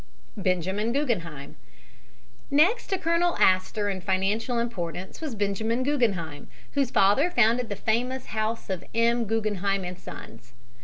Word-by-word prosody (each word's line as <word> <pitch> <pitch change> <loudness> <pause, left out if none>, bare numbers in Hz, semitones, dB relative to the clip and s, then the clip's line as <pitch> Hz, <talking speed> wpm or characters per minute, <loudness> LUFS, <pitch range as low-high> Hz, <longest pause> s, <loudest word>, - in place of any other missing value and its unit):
BENJAMIN 190 +3 0
GUGGENHEIM 170 - -2 0.9
Next 335 - +3
to 385 - 0
Colonel 335 +1 +1
Astor 190 +3 +3
in 190 -2 -2
financial 200 +6 0
importance 190 - -4
was 300 -7 -4
Benjamin 220 +4 0
Guggenheim, 200 - -1 0.2
whose 275 -3 +1
father 225 - +4
founded 240 -4 +3
the 205 - -2
famous 250 +5 -1
house 220 -1 -2
of 185 -2 -3
M. 235 +1 +3
Guggenheim 205 -3 0
and 180 0 -6
Sons. 115 +2 -11
220 Hz, 125 wpm, -26 LUFS, 190-250 Hz, 0.9 s, father